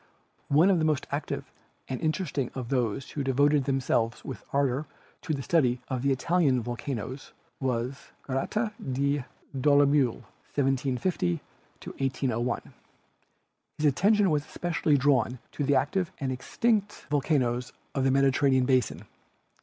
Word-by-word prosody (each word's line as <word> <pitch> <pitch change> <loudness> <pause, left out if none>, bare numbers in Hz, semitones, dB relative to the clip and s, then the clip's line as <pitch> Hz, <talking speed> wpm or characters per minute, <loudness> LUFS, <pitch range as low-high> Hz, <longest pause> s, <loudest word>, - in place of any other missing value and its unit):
One 160 +7 +5
of 180 - +3
the - - +1
most 150 -2 +1
active 140 +1 -3 0.4
and 130 - -4
interesting 155 -5 -1
of 125 -3 -5
those 125 -2 -1
who 145 - -3
devoted 140 +1 +3
themselves 125 -4 0
with 135 - -6
ardor 140 +1 +1 0.3
to 170 - -4
the 140 -3 -2
study 130 -7 +2
of 130 -2 -2
the 140 +1 +2
Italian 140 -1 +2
volcanoes 120 +2 -5 0.3
was 130 0 -2 0.2
Gratet 210 - -1 0.2
de 140 0 0 0.3
Dolomieu 140 -2 +3 0.3
(1750 135 - +1 0.5
1801). 125 -3 -2 1.0
His 155 - -1
at 140 -3 +4
tention 205 - +4
was 150 -1 +1
especially 160 -3 0
drawn 130 -3 +2
to 145 - -3
the 140 0 +3
active 175 +5 +1
and 135 -2 -1
extinct 205 - 0
70 - - -12
GEOLOGY - - -19
volcanoes 125 -4 +1 0.2
of 135 - 0
the 135 - +3
Mediterranean 135 -1 +3
basin. 130 -3 +1
135 Hz, 140 wpm, -28 LUFS, 130-150 Hz, 1.0 s, One